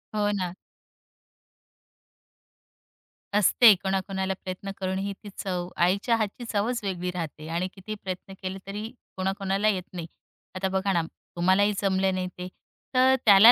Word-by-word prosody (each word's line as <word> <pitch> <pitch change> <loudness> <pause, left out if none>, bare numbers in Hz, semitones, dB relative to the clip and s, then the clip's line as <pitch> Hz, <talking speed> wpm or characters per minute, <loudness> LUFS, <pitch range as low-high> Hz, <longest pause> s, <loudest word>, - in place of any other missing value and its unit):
हो 205 -1 +2
ना. 185 -4 -2 2.8
असते 210 +2 +7
कोणाकोणाला 190 0 -1
प्रयत्न 190 +1 -5
करूनही 190 +1 -2
ती 205 - -7
चव, 180 -2 -2
आईच्या 200 +7 +3
हातची 215 +2 -2
चवच 230 +4 +1
वेगळी 180 -2 -2
राहते. 160 -3 -5
आणि 170 +3 -1
कितीही 215 +3 -6
प्रयत्न 190 +1 -5
केले 190 0 -3
तरी 205 +2 -4 0.3
कोणाकोणाला 195 +2 0
येत 190 -4 +2
नाही. 170 -2 -5 0.5
आता 190 +1 0
बघा 190 +1 +1
ना, 170 - +3 0.3
तुम्हालाही 190 +4 +4
जमलं 190 -1 +2
नाही 185 0 -1
ते. 180 0 -5 0.5
तर 260 +1 +6
त्याला 210 +2 +10
190 Hz, 135 wpm, -27 LUFS, 185-205 Hz, 2.8 s, त्याला